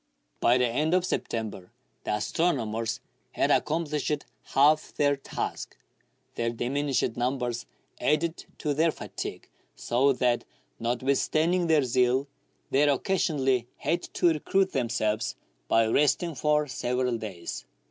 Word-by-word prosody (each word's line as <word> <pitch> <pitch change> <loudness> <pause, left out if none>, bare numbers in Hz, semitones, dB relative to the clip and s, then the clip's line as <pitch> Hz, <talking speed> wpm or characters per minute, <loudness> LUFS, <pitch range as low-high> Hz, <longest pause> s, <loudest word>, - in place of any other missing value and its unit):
By 120 - +4
the 125 - +3
end 150 +8 +1
of 185 -1 +2
September 110 - -3 0.4
the - - 0
astronomers 115 -3 -1 0.3
had - - +2
accom 160 +2 +1
plished 150 0 -1 0.3
half 150 +3 +4
their 145 -1 +3
task. 135 - -5 0.6
Their 115 0 -1
diminished 130 +1 -1
numbers 120 -1 -2 0.3
added 160 +3 0
to 150 - -1
their 160 +3 +3
fatigue, - - -7 0.3
so 130 +4 +2
that, 125 -1 +1 0.4
notwithstanding 140 +8 +1
their 155 -3 +4
zeal, 125 +1 +2 0.5
they 135 - +3
occasionally 135 -5 +1
had 170 +4 0
to 175 - +4
recruit 190 +4 +1
themselves 115 -4 0 0.3
by 115 0 +4
resting 150 +8 +2
for 150 +2 +2
several 125 -2 -1
days. 95 -6 -6
135 Hz, 120 wpm, -27 LUFS, 120-155 Hz, 0.6 s, By